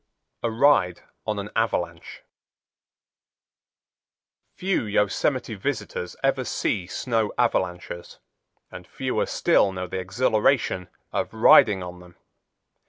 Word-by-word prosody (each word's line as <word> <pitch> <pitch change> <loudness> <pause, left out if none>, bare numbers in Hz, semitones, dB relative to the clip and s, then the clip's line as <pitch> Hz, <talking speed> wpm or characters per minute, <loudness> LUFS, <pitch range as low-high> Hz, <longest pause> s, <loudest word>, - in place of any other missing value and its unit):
A 115 - 0
Ride 110 -7 +3 0.2
On 105 -1 -1
An 100 +1 -5
Avalanche 85 -7 -2 2.3
Few 190 -9 -1
Yosemite 110 +4 0
visitors 105 -5 -4
ever 135 -1 +2
see 95 -6 -2
snow 110 +2 -1
avalanches 90 -7 -2 0.5
and - - -10
fewer - - -2
still 100 - +3
know 90 -1 -4
the 95 +1 -4
exhilaration 105 0 +1 0.2
of - - -1
riding 100 -4 +6
on 90 0 -8
them. 90 -1 -16
105 Hz, 100 wpm, -24 LUFS, 90-120 Hz, 2.3 s, riding